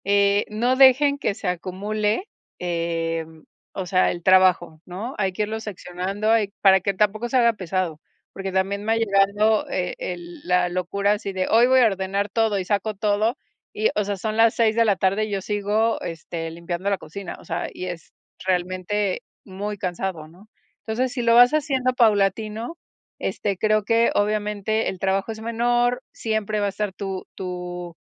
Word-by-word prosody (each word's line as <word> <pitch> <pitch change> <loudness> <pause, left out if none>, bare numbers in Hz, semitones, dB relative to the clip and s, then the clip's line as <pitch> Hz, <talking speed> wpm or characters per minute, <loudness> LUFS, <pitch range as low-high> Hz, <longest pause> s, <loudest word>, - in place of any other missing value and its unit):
Eh, 200 0 +3
no 235 +4 +1
dejen 275 +2 +6
que 205 - -1
se 200 - -6
acumule, 210 - -2 0.3
em, 165 -2 -3 0.3
o 190 - -4
sea, 185 +1 +2
el 175 -1 -7
trabajo, 180 -4 +4
¿no? 200 +8 -6
Hay 195 -2 +1
que 200 +4 -2
irlo 220 +1 -3
seccionando, 200 0 -3
hay 215 -3 +2
para 190 -1 +6
que 200 +2 0
tampoco 210 +4 0
se 260 - +2
haga 235 -2 +4
pesado, 185 -5 -3 0.3
porque 195 0 -5
también 195 +2 -1
me 220 +1 +1
ha - - +2
llegado 205 0 +2
e 180 -1 -2
el 175 -1 -6
la 180 0 +2
locura 200 +3 0
así 200 -2 -4
de: 185 -1 -1
"Hoy 230 +2 +5
voy 260 0 +5
a - - +6
ordenar 195 0 -1
todo". 220 0 +1
Y 190 - -2
saco 205 +2 -1
todo 210 +5 +1 0.4
y, 215 +1 +1
o 210 - +1
sea, 200 0 -3
son 215 +3 -3
las 225 0 +5
6 220 -2 +2
de 230 - +4
la 205 -3 +3
tarde, 195 +3 +1
yo 200 -1 -1
sigo, 210 +3 0
este, 165 0 -5
limpiando 170 +3 -4
la 200 - +1
cocina, 185 +4 -8
o - - -16
sea, 165 +1 -3
y 185 - -6
es 175 -2 -7 0.3
realmente 185 +2 -1 0.2
muy 205 +2 -5
cansado, 180 -4 -4
¿no? 185 +7 -19 0.3
Entonces, 245 +3 -2
si 255 - -2
lo 230 0 +4
vas 245 +1 +8
haciendo 270 -4 +1
paulatino, 220 - +1 0.4
este, 200 -2 -2
creo 215 +1 +2
que 230 +1 +3
obviamente 210 +1 0
el 190 - -5
trabajo 195 +3 0
es 220 - -7
menor. 240 +2 +1
Siempre 215 -1 -2
va 205 - +1
a - - +1
estar 205 +1 -3
tu 190 0 -6
tu 180 -2 -6
200 Hz, 180 wpm, -23 LUFS, 185-220 Hz, 0.4 s, vas